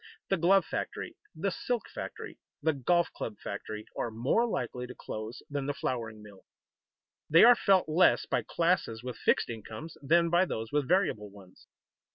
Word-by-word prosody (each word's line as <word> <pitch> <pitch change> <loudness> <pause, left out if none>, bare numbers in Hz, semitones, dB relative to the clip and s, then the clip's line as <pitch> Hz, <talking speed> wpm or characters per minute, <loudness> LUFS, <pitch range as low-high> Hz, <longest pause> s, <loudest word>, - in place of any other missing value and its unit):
The 195 - +2
glove 185 +2 +4
factory, - - -4 0.2
the 190 +5 -1
silk 245 +5 -2
factory, - - -8 0.2
the 160 - +3
golf 170 +6 +1
club 105 -3 -5
factory 105 +1 -6
are - - -2
more 125 - +1
likely 125 - -3
to 125 - -10
close 110 +3 -7
than 140 -1 -3
the 145 - -1
flouring 110 -4 -4
mill. 100 -2 -14 0.9
They 165 +3 +7
are 245 +2 +10
felt 195 -6 +3
less 170 +4 +4
by - - 0
classes 165 -10 0
with 125 -1 -5
fixed - - +2
incomes 115 +8 -8
than 165 +4 +3
by 175 +2 +4
those 115 -9 -4
with 145 -2 0
variable 175 - +1
ones. 95 -2 -17
145 Hz, 170 wpm, -30 LUFS, 110-175 Hz, 0.9 s, are